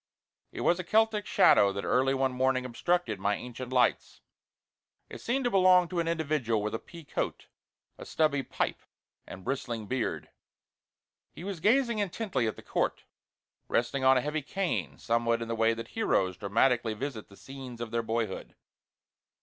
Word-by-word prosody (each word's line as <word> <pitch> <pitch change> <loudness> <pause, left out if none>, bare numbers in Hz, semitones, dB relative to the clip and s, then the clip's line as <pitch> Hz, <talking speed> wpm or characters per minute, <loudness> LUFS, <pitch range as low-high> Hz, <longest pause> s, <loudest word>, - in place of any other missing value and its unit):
It - - -6
was 175 - +2
a - - -2
Celtic 215 +1 +2
shadow 100 -1 +5
that 100 - -4
early 135 +1 +2
one 135 0 +1
morning 130 0 +1
obstructed 175 +9 -1
my 105 +1 +1
ancient 125 +2 -7
lights. 125 -2 +1 0.9
It - - -9
seemed 265 +3 0
to 245 - +1
belong 185 -2 +5
to 180 - -2
an 165 - 0
individual 150 -10 0
with 105 - -2
a 115 - -2
pea 170 +5 -12
coat, - - -3 0.5
a - - -8
stubby 150 -3 +1
pipe, - - -3 0.5
and 95 - -9
bristling 120 -2 -3
beard. 125 +2 -3 1.0
He - - -11
was 195 -3 -5
gazing 235 - +3
intently 190 - -1
at 110 - -2
the - - -13
court, - - -1 0.6
resting 125 +3 0
on 130 0 +6
a - - +2
heavy 150 +3 -2
cane, 110 - -2
somewhat 115 +2 +1
in 115 - -4
the 115 - -2
way 115 0 +2
that 115 0 -7
heroes 95 - +1
dramatically 110 +3 +1
visit 125 -2 -5
the 100 - -16
scenes 130 -3 -9
of 120 -2 -5
their 115 - 0
boyhood. 115 -3 -3
130 Hz, 170 wpm, -29 LUFS, 115-170 Hz, 1.0 s, on